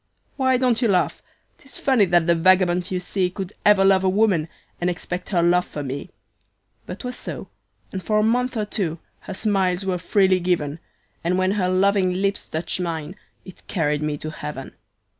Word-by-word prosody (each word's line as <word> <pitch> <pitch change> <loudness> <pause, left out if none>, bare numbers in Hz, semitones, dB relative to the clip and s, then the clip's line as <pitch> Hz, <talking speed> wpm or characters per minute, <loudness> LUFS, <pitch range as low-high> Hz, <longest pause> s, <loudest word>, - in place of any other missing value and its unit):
"Why 260 -2 +2
don't 250 -2 +1
you 235 - +3
laugh? 185 -4 +1 0.4
'Tis 270 - -11
funny 260 -7 +3
that 175 -2 +3
the 170 - +4
vagabond 180 +1 +3
you 185 - -1
see 180 0 -1
Could 190 +1 -6
ever 205 -2 +5
love 190 -1 +4
a 190 - +3
woman, 190 -5 +2 0.3
and 175 - 0
expect 180 +1 -5
her 175 -4 +2
love 175 +1 +4
for 145 - -6
me; 135 +1 -5 0.8
But - - -7
'twas 250 -1 -5
so, - - -7 0.4
and 190 - -4
for 215 +3 0
a 215 - +3
month 245 +2 +1
or 215 - 0
two, 180 -6 -2 0.2
her - - -8
smiles 190 -3 0
were 185 -2 -1
freely 190 +1 +3
given, 170 -4 -1 0.4
And 175 +2 +1
when 185 0 +2
her 195 -3 0
loving 185 0 +2
lips 195 +1 -1
touched 165 +3 -3
mine, 165 -1 -4 0.3
it 185 - -13
carried 150 -5 0
me 150 -1 -1
to 155 +2 -6
Heaven. 150 -3 -7
185 Hz, 190 wpm, -23 LUFS, 170-200 Hz, 0.8 s, ever